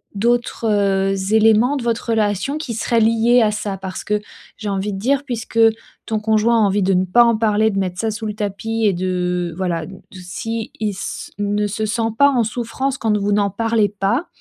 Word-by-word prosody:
D'autres, 235 Hz, +3 st, 0 dB
heu, 195 Hz, -1 st, +1 dB
éléments 225 Hz, +5 st, +4 dB
de 270 Hz, -, -3 dB
votre 230 Hz, 0 st, -1 dB
relation 210 Hz, +5 st, 0 dB
qui 305 Hz, -7 st, -5 dB
seraient 230 Hz, +1 st, +1 dB
liés 230 Hz, +2 st, +4 dB
à 215 Hz, -2 st, +3 dB
ça? 205 Hz, -2 st, -4 dB
Parce 190 Hz, 0 st, -7 dB
que, 210 Hz, 0 st, 0 dB, 0.4 s
j'ai 215 Hz, -2 st, -4 dB
envie 200 Hz, +1 st, -2 dB
de 195 Hz, -, -4 dB
dire 275 Hz, +5 st, +1 dB
puisque 230 Hz, -3 st, -4 dB, 0.5 s
ton 215 Hz, -1 st, -2 dB
conjoint 220 Hz, +2 st, +2 dB
a 225 Hz, -, +3 dB
envie 200 Hz, -1 st, +2 dB
de 190 Hz, +1 st, +2 dB
ne 185 Hz, 0 st, +3 dB
pas 215 Hz, +6 st, +4 dB
en 235 Hz, -1 st, +3 dB
parler, 220 Hz, 0 st, +2 dB
de 200 Hz, -, -3 dB
mettre 180 Hz, -2 st, -3 dB
ça 225 Hz, -1 st, 0 dB
sous 220 Hz, +1 st, -6 dB
le 210 Hz, -, -3 dB
tapis 215 Hz, +2 st, -3 dB
et 200 Hz, -, +3 dB
de 180 Hz, -1 st, -2 dB
voilà, 170 Hz, -4 st, -2 dB
de 190 Hz, -1 st, -11 dB
s'il 215 Hz, +5 st, -5 dB
s 210 Hz, -3 st, -4 dB
ne 205 Hz, 0 st, 0 dB
se 215 Hz, +2 st, -3 dB
sent 225 Hz, +1 st, -1 dB
pas 280 Hz, 0 st, +6 dB
en 245 Hz, -4 st, +1 dB
souffrance 245 Hz, +4 st, -3 dB
quand 215 Hz, -2 st, +1 dB
vous 205 Hz, 0 st, 0 dB
n'en 205 Hz, -1 st, +2 dB
parlez 225 Hz, +1 st, +1 dB
pas, 205 Hz, -, -1 dB
215 Hz, 210 wpm, -19 LUFS, 195-230 Hz, 0.5 s, pas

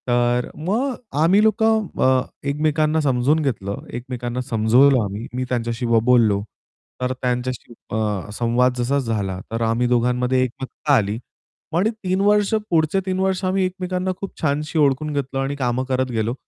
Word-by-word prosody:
तर 120 Hz, 0 st, +1 dB
मग 225 Hz, -, -1 dB, 0.3 s
आम्ही 185 Hz, +6 st, +5 dB
लोक 220 Hz, +1 st, +2 dB
अ, 210 Hz, -12 st, +2 dB, 0.3 s
एकमेकांना 155 Hz, +2 st, +1 dB
समजून 135 Hz, +2 st, +2 dB
घेतलं, 100 Hz, -8 st, -3 dB
एकमेकांना 125 Hz, 0 st, -4 dB
समजवलं 125 Hz, +2 st, +4 dB
आम्ही 100 Hz, +3 st, -5 dB
मी 130 Hz, -, -1 dB
त्यांच्याशी 120 Hz, -1 st, -2 dB
ब 115 Hz, -1 st, +3 dB
बोललो. 115 Hz, -5 st, +4 dB, 0.6 s
तर 125 Hz, 0 st, 0 dB
त्यांच्याशी 125 Hz, -1 st, -2 dB, 0.2 s
अ, 105 Hz, -3 st, -2 dB
संवाद 120 Hz, +3 st, +2 dB
जसा 125 Hz, +4 st, +1 dB
झाला, 105 Hz, -7 st, -2 dB
तर 115 Hz, +1 st, -2 dB
आम्ही 115 Hz, +2 st, +1 dB
दोघांमध्ये 125 Hz, +1 st, +2 dB
एकमतता 130 Hz, +4 st, -3 dB
आली 105 Hz, -2 st, +1 dB, 0.5 s
पण 175 Hz, +6 st, +2 dB
3 195 Hz, -4 st, -2 dB
वर्ष 205 Hz, +1 st, +3 dB, 0.2 s
पुढचे 165 Hz, +2 st, +2 dB
3 185 Hz, -1 st, -1 dB
वर्ष 190 Hz, 0 st, 0 dB
आम्ही 185 Hz, 0 st, +1 dB
एकमेकांना 185 Hz, 0 st, -2 dB
खूप 195 Hz, -, -4 dB
छानशी 150 Hz, +1 st, 0 dB
ओळखून 150 Hz, +1 st, +2 dB
घेतलं 135 Hz, -1 st, -2 dB
आणि 135 Hz, +1 st, -1 dB
कामं 125 Hz, -2 st, -1 dB
करत 130 Hz, -1 st, 0 dB
गेलो. 115 Hz, 0 st, -1 dB
130 Hz, 155 wpm, -21 LUFS, 120-160 Hz, 0.6 s, आम्ही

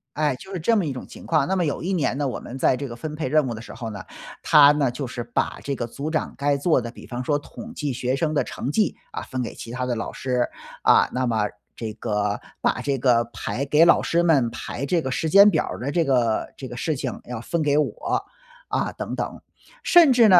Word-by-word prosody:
哎， 150 Hz, -3 st, +1 dB
就 190 Hz, +9 st, -11 dB
是 180 Hz, -, -2 dB
这 230 Hz, +8 st, +2 dB
么 200 Hz, -6 st, +2 dB
一 145 Hz, -, -2 dB
种 130 Hz, -, -7 dB
情 -, -, -12 dB
况。 160 Hz, -2 st, +2 dB
那 190 Hz, -, +1 dB
么 180 Hz, -, +1 dB
有 145 Hz, -, -2 dB
一 190 Hz, +3 st, -1 dB
年 140 Hz, -5 st, 0 dB
呢， 145 Hz, -2 st, 0 dB
我 125 Hz, -, -3 dB
们 130 Hz, -, -8 dB
在 130 Hz, -, +3 dB
这 140 Hz, +2 st, -4 dB
个 120 Hz, -, -7 dB
分 150 Hz, +4 st, -5 dB
配 155 Hz, -4 st, -2 dB
任 155 Hz, -2 st, +3 dB
务 120 Hz, -, -2 dB
的 110 Hz, -, -7 dB
时 -, -, -10 dB
候 115 Hz, -3 st, -6 dB
呢， 105 Hz, -, -7 dB, 0.4 s
他 145 Hz, -1 st, +7 dB
呢， 140 Hz, -4 st, +1 dB
就 130 Hz, +1 st, -4 dB
是 120 Hz, -1 st, -5 dB
把 120 Hz, -, -2 dB
这 140 Hz, -, -2 dB
个 120 Hz, -3 st, -3 dB
组 140 Hz, +6 st, -5 dB
长 155 Hz, -, -2 dB
该 140 Hz, 0 st, +1 dB
做 145 Hz, -3 st, +2 dB
的 115 Hz, 0 st, -6 dB
比 -, -, -13 dB
方 125 Hz, 0 st, -4 dB
说 145 Hz, +2 st, +1 dB
统 225 Hz, +10 st, -10 dB
计 145 Hz, -4 st, -2 dB
学 125 Hz, +1 st, -1 dB
生 155 Hz, +1 st, 0 dB
的 145 Hz, -, +2 dB
成 135 Hz, -, -5 dB
绩， 215 Hz, +2 st, +1 dB
啊， -, -, -5 dB
分 130 Hz, -1 st, -4 dB
给 120 Hz, -, -4 dB
其 115 Hz, -, -8 dB
他 125 Hz, +1 st, -2 dB
的 125 Hz, -1 st, -1 dB
老 115 Hz, -, -4 dB
师。 125 Hz, -2 st, 0 dB, 0.4 s
啊， -, -, +5 dB
那 130 Hz, 0 st, 0 dB
么 110 Hz, -3 st, +1 dB, 0.3 s
这 110 Hz, -2 st, -4 dB
个 105 Hz, -2 st, -1 dB, 0.2 s
把 -, -, 0 dB
这 140 Hz, -1 st, 0 dB
个 120 Hz, -2 st, +3 dB
排 135 Hz, -, -3 dB
给 150 Hz, +4 st, +5 dB
老 170 Hz, -, +6 dB
师 170 Hz, +1 st, +1 dB
们 145 Hz, -9 st, +3 dB
排 130 Hz, -, -5 dB
这 165 Hz, +3 st, +1 dB
个 130 Hz, -, -3 dB
时 160 Hz, -, -1 dB
间 200 Hz, +5 st, +8 dB
表 -, -, +1 dB
儿 -, -, -5 dB
的 135 Hz, +4 st, -2 dB
这 170 Hz, +3 st, +2 dB
个 125 Hz, -6 st, +1 dB
这 130 Hz, -, -6 dB
个 120 Hz, -, -8 dB
事 155 Hz, +6 st, -1 dB
情 130 Hz, -2 st, -4 dB
要 125 Hz, -2 st, -6 dB
分 165 Hz, +7 st, -2 dB
给 145 Hz, -1 st, +2 dB
我， 150 Hz, -, -1 dB, 0.4 s
啊， -, -, -1 dB
等 -, -, -5 dB
等。 -, -, -4 dB, 0.4 s
甚 340 Hz, -6 st, +7 dB
至 235 Hz, -3 st, +6 dB
呢， 180 Hz, -3 st, +8 dB
140 Hz, 280 characters per minute, -24 LUFS, 125-155 Hz, 0.4 s, 间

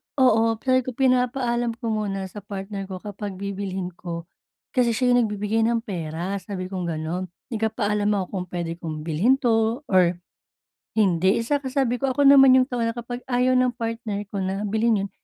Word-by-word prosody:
oo, 225 Hz, -4 st, +4 dB, 0.4 s
pinapaalam 250 Hz, -2 st, +1 dB
ko 230 Hz, -1 st, -3 dB
muna 200 Hz, -3 st, -2 dB
sa 210 Hz, -, -7 dB
partner 195 Hz, 0 st, -6 dB
ko 190 Hz, -, -6 dB
kapag 205 Hz, -1 st, -6 dB
bibilhin 190 Hz, -1 st, -4 dB
ko 170 Hz, -1 st, -6 dB, 0.5 s
kasi 240 Hz, -4 st, +2 dB
siya 250 Hz, 0 st, +2 dB
'yong 245 Hz, -2 st, +4 dB
nagbibigay 210 Hz, +2 st, -1 dB
ng 235 Hz, -1 st, 0 dB
pera, 175 Hz, -1 st, -4 dB
sabi 185 Hz, 0 st, -6 dB
kong 180 Hz, -2 st, -3 dB
gano'n, 165 Hz, +3 st, -3 dB, 0.2 s
Nagpapaalam 210 Hz, -2 st, 0 dB
ako 195 Hz, -2 st, 0 dB
kung 185 Hz, -2 st, -3 dB
puwede 175 Hz, -1 st, -4 dB
kong 155 Hz, -3 st, -5 dB
bilhin 170 Hz, +11 st, +3 dB
'to 230 Hz, 0 st, +1 dB
or 180 Hz, -2 st, +4 dB, 0.8 s
hindi. 190 Hz, -2 st, +3 dB
Saka 280 Hz, +4 st, -1 dB
sabi 255 Hz, -3 st, +1 dB
ko, 265 Hz, +1 st, 0 dB
Ako 285 Hz, -, 0 dB
naman 270 Hz, -2 st, +8 dB
'yong 255 Hz, 0 st, +5 dB
tao 245 Hz, -2 st, -1 dB
na 230 Hz, -, -1 dB
kapag 245 Hz, +1 st, -6 dB
ayaw 255 Hz, 0 st, +2 dB
ng 250 Hz, -1 st, +2 dB
partner 230 Hz, -3 st, -3 dB
ko 205 Hz, -, -5 dB
na 195 Hz, +2 st, -2 dB
bilhin 220 Hz, 0 st, +2 dB
'yon, -, -, -8 dB
215 Hz, 175 wpm, -24 LUFS, 190-240 Hz, 0.8 s, naman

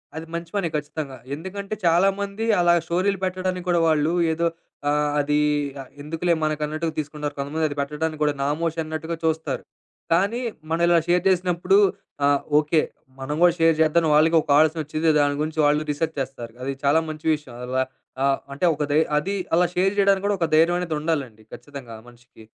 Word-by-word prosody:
అది 160 Hz, +1 st, -6 dB
మంచి 170 Hz, 0 st, -5 dB
పనే 195 Hz, -4 st, 0 dB
ఖచ్చితంగా. 150 Hz, -2 st, -4 dB, 0.2 s
ఎందుకంటే, 195 Hz, +5 st, -6 dB
చాలామంది 195 Hz, +5 st, +1 dB
అలా 175 Hz, -1 st, +4 dB
స్టోరీలు 185 Hz, +3 st, 0 dB
పెట్టడానికి 185 Hz, -1 st, -2 dB
కూడా 175 Hz, -1 st, +3 dB
వాళ్ళు 155 Hz, +1 st, +2 dB, 0.2 s
ఏదో 170 Hz, +1 st, 0 dB, 0.4 s
ఆహ్, 150 Hz, 0 st, +1 dB
అది 145 Hz, +1 st, +1 dB, 0.6 s
ఎందుకులే 165 Hz, +4 st, -1 dB
మనకన్నట్టుగా 155 Hz, +1 st, -2 dB
తీసుకుంటారు. 150 Hz, 0 st, -4 dB
కొంతమంది 150 Hz, +3 st, -1 dB
అది 145 Hz, -, -6 dB
పెట్టడానికి 150 Hz, +2 st, -2 dB
గూడా 150 Hz, -, +2 dB
నామోషి 155 Hz, +4 st, -1 dB
అన్నట్టుగా 160 Hz, +1 st, -4 dB
చూస్తారు. 160 Hz, 0 st, -1 dB, 0.5 s
కానీ 200 Hz, +7 st, +1 dB, 0.3 s
మనం 165 Hz, +1 st, 0 dB
ఇలా 170 Hz, -1 st, +5 dB
షేర్ 175 Hz, 0 st, +2 dB
జేసినప్పుడు 180 Hz, 0 st, +2 dB, 0.5 s
ఆ! -, -, +5 dB, 0.3 s
ఓకే. 155 Hz, +1 st, +2 dB, 0.4 s
మనం 135 Hz, +3 st, -3 dB
గూడా 175 Hz, -1 st, +6 dB
షేర్ 165 Hz, 0 st, +4 dB
జేద్దామని 160 Hz, +1 st, +3 dB
వాళ్ళకి 160 Hz, +2 st, +5 dB
ఒక -, -, -16 dB
ఆలోచన 160 Hz, +1 st, +3 dB
ఒచ్చిద్ది. 155 Hz, +2 st, 0 dB
దాని 145 Hz, 0 st, +2 dB
గురించి 155 Hz, +1 st, -3 dB
వాళ్ళు 150 Hz, +1 st, +2 dB
రీసెర్చ్ 160 Hz, +2 st, -2 dB
చేస్తారు. 120 Hz, -4 st, -7 dB
అది 135 Hz, +1 st, -2 dB
చాలా 145 Hz, +3 st, +4 dB
మంచి 155 Hz, +1 st, -8 dB
విషయం. 145 Hz, -5 st, -12 dB
అలా 130 Hz, +1 st, 0 dB, 0.4 s
ఆహ్, 140 Hz, 0 st, +2 dB
అంటే 145 Hz, +6 st, -1 dB
ఒక 150 Hz, -, -2 dB
ధై 155 Hz, -, +5 dB, 0.2 s
అది 195 Hz, +6 st, -3 dB, 0.2 s
అలా 175 Hz, 0 st, +4 dB
షేర్ 190 Hz, +2 st, +2 dB
చేయడానికి 195 Hz, 0 st, +3 dB
కూడా 205 Hz, -1 st, +1 dB
ఒక 165 Hz, -, +1 dB
ధైర్యం 165 Hz, +2 st, +4 dB
అనేది 170 Hz, -3 st, -2 dB
ఉండాలండి 135 Hz, -9 st, -3 dB
ఖచ్చితంగా 135 Hz, -6 st, -9 dB
మనిషికి. 120 Hz, -1 st, -17 dB
160 Hz, 170 wpm, -23 LUFS, 150-175 Hz, 0.6 s, గూడా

